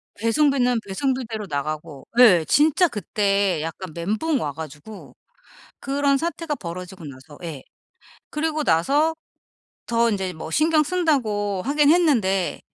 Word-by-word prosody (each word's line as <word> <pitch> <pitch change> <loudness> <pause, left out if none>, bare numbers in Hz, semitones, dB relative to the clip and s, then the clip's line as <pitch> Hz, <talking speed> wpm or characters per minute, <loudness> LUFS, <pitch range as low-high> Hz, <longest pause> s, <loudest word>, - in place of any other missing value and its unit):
배송비는 250 +2 +2
배송비대로 225 -1 -2
나가고 150 0 -4
예 185 -10 +7
진짜 315 +4 +4
그때 200 - 0
약간 165 +2 -6
멘붕 215 - -1
와 145 - -2
가지고 160 +7 -10 0.6
그런 280 0 +1
사태가 330 0 -3
벌어지고 180 - -8
나서 140 +1 -12
예 155 -6 -7 0.7
그러고 310 0 -2
나서 285 - +2 0.7
더 235 0 +2
인제 190 -3 -2
뭐 160 0 -8
신경 310 - +3
쓴다고 235 - 0
하긴 290 +1 +4
했는데 230 - +2
215 Hz, 265 characters per minute, -23 LUFS, -, 0.7 s, 예